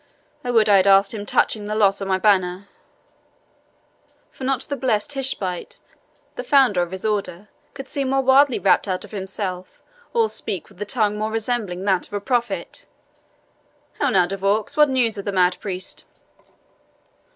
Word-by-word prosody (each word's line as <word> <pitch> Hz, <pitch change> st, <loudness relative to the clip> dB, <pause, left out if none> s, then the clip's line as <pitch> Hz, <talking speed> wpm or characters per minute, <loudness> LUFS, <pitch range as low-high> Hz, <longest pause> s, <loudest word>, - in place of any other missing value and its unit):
I 250 Hz, -, -4 dB
would 225 Hz, -3 st, +3 dB
I 205 Hz, -1 st, +6 dB
had 190 Hz, +1 st, +3 dB
asked 195 Hz, +1 st, +5 dB
him 205 Hz, -2 st, -6 dB
touching 210 Hz, +1 st, +1 dB
the 210 Hz, +1 st, -3 dB
loss 200 Hz, -2 st, +2 dB
of 195 Hz, -, -3 dB
my 190 Hz, -1 st, +1 dB
banner; 185 Hz, -1 st, +1 dB, 1.6 s
for -, -, -11 dB
not 265 Hz, -2 st, 0 dB
the 285 Hz, -, -4 dB
blessed 240 Hz, -2 st, -1 dB
Tishbite, 255 Hz, -10 st, -3 dB, 0.6 s
the -, -, -5 dB
founder 260 Hz, -, +4 dB
of 175 Hz, -, -2 dB
his 190 Hz, +3 st, -7 dB
order, 205 Hz, -2 st, -3 dB, 0.3 s
could 270 Hz, -, -8 dB
seem 275 Hz, -1 st, -2 dB
more 270 Hz, 0 st, +2 dB
wildly 265 Hz, 0 st, +4 dB
rapt 190 Hz, 0 st, +2 dB
out 185 Hz, -1 st, -3 dB
of -, -, -16 dB
himself, 190 Hz, -2 st, -6 dB, 0.3 s
or 460 Hz, -2 st, +2 dB
speak 190 Hz, -, -5 dB
with 185 Hz, -, -18 dB
a -, -, -1 dB
tongue 210 Hz, -1 st, 0 dB
more 215 Hz, +1 st, -1 dB
resembling 220 Hz, -5 st, -3 dB
that 190 Hz, -3 st, +1 dB
of -, -, -20 dB
a 205 Hz, -, -1 dB
prophet. 220 Hz, -5 st, -3 dB, 1.1 s
How 285 Hz, -, +2 dB
now, 185 Hz, -6 st, +4 dB
De 195 Hz, +3 st, -5 dB
Vaux, 205 Hz, +6 st, 0 dB
what 300 Hz, -1 st, +5 dB
news 235 Hz, -5 st, +1 dB
of 200 Hz, -, -7 dB
the 200 Hz, -, -1 dB
mad 180 Hz, -1 st, +2 dB
priest?" 185 Hz, -2 st, -6 dB
205 Hz, 175 wpm, -22 LUFS, 190-245 Hz, 1.6 s, I